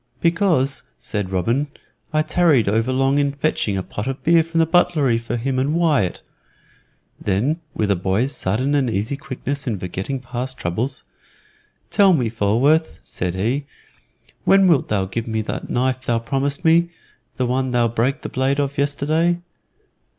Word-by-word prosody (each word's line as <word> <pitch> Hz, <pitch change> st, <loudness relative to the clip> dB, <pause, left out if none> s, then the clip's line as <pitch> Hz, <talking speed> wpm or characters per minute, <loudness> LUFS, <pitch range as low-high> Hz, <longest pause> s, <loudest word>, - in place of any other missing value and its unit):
"Because," 165 Hz, -6 st, +2 dB, 0.2 s
said 105 Hz, -3 st, -4 dB
Robin, 115 Hz, +10 st, 0 dB, 0.4 s
"I 155 Hz, 0 st, +2 dB
tarried 155 Hz, -, +3 dB
overlong 130 Hz, +6 st, +2 dB
in 140 Hz, -1 st, +1 dB
fetching 140 Hz, -8 st, -1 dB
a 95 Hz, -, -2 dB
pot 105 Hz, +5 st, -5 dB
of 135 Hz, 0 st, -4 dB
beer 165 Hz, 0 st, +5 dB
from 165 Hz, +1 st, -5 dB
the 165 Hz, -, +5 dB
buttery 160 Hz, -8 st, +2 dB
for 115 Hz, +1 st, -4 dB
him 130 Hz, +2 st, -1 dB
and 140 Hz, +4 st, 0 dB
Wyatt." 150 Hz, -, +1 dB, 1.0 s
Then, 125 Hz, -, 0 dB
with 105 Hz, -2 st, 0 dB
a -, -, +3 dB
boy's 100 Hz, +10 st, 0 dB
sudden 125 Hz, +8 st, -1 dB
and 140 Hz, -4 st, +2 dB
easy 110 Hz, +5 st, -1 dB
quickness 140 Hz, +1 st, -5 dB
in 110 Hz, -4 st, -1 dB
forgetting 95 Hz, +9 st, -4 dB
past 130 Hz, +1 st, -5 dB
troubles, 115 Hz, +11 st, -3 dB, 0.9 s
"Tell 195 Hz, -2 st, +5 dB
me, 125 Hz, -8 st, +1 dB
Falworth," 120 Hz, +9 st, +2 dB
said 90 Hz, 0 st, -4 dB
he, 120 Hz, +9 st, -1 dB, 0.8 s
"when 195 Hz, -1 st, +5 dB
wilt 165 Hz, -7 st, +3 dB
thou 100 Hz, -3 st, 0 dB
give 115 Hz, +5 st, -4 dB
me 110 Hz, -1 st, -1 dB
that -, -, -5 dB
knife 130 Hz, +1 st, 0 dB
thou 120 Hz, -2 st, 0 dB
promised 135 Hz, +5 st, -2 dB
me 170 Hz, +1 st, +4 dB, 0.5 s
the 130 Hz, -, +1 dB
one 130 Hz, +1 st, 0 dB
thou 120 Hz, -1 st, +2 dB
break 120 Hz, +6 st, 0 dB
the -, -, -3 dB
blade 135 Hz, +2 st, 0 dB
of 140 Hz, 0 st, -1 dB
yesterday?" 155 Hz, +4 st, +1 dB
130 Hz, 160 wpm, -21 LUFS, 115-145 Hz, 1.0 s, beer